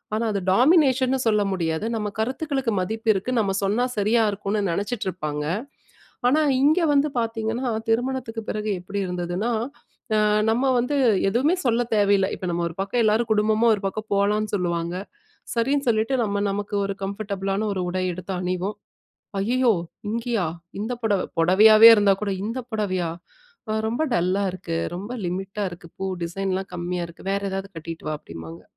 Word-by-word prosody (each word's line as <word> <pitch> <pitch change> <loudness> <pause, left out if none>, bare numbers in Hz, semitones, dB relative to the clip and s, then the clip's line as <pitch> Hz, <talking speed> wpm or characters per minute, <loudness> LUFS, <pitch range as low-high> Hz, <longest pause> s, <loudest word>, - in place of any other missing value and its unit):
ஆனா, 225 - 0
அது 200 - -1
டாமினேஷன்னு 265 - +4
சொல்ல 210 -1 +3
முடியாது. 165 +1 -1
நம்ம 210 -1 -2
கருத்துக்களுக்கு 265 0 -1
மதிப்பு 220 +4 -2
இருக்கு. 195 +6 -2
நம்ம 195 -3 +1
சொன்னா 215 +6 +2
சரியா 220 +3 +3
இருக்குன்னு 205 +1 -2
நினைச்சிட்டு 205 +3 -2
இருப்பாங்க. 150 -4 -4 0.9
ஆனா, 305 +4 +3 0.2
இங்க 310 +5 +4
வந்து 285 +1 +3
பார்த்தீங்கன்னா, 225 +2 -2 0.2
திருமணத்துக்கு 235 -1 -1
பிறகு 215 0 -2
எப்பிடி 200 +3 -4
இருந்ததுன்னா, 180 +6 -2 0.6
அ - - +3 0.3
நம்ம 245 +4 +1 0.2
வந்து 285 +4 -1 0.3
எதுவுமே 290 - +2
சொல்ல 240 +1 +3
தேவையில்ல. 200 -2 +4
இப்ப 185 - -6
நம்ம 170 0 -1
ஒரு 165 - -12
பக்கம் 230 +5 0
எல்லாரும் 220 +2 +2
குடும்பமா 215 +2 +2
ஒரு 200 - -9
பக்கம் 215 +2 -7
போலான்னு 210 +1 +1
சொல்லுவாங்க. 170 -1 -2 0.6
சரின்னு 275 +4 +1
சொல்லிட்டு 225 +3 +2
நம்ம 200 -2 -1
நமக்கு 205 +1 -3
ஒரு 200 - -1
கம்ஃபர்டபுளான 200 0 -2
ஒரு 190 - -2
உடை 185 +1 -2
எடுத்து 185 +2 -6
அணிவோம். 185 +3 -2 0.6
ஐயயோ! 245 +4 +2 0.4
இங்கயா? 230 -5 -1 0.3
இந்த 220 +4 -3
புடவ! 205 -4 +2 0.2
புடவையாவே 215 +6 +8
இருந்தா 205 -2 +4
கூட 205 - -1
இந்த 230 +4 -3
புடவையா? 185 -5 -1 0.6
அ - - +1 0.2
ரொம்ப 240 +7 -1
டல்லா 185 +3 +1
இருக்கு, 170 -3 -4 0.2
ரொம்ப 205 +6 -6
லிமிட்டா 195 +3 -3
இருக்கு, 175 -1 -11
பூ 195 - -2 0.2
டிசைன்லாம் 190 +2 -3
கம்மியா 175 0 -3
இருக்கு, 170 +3 -10
வேற 200 - 0
ஏதாவது 195 +1 -4
கட்டிட்டு 165 0 -7
வா! 155 - -1
அப்பிடிம்பாங்க 80 - -10
205 Hz, 155 wpm, -24 LUFS, 185-230 Hz, 0.9 s, புடவையாவே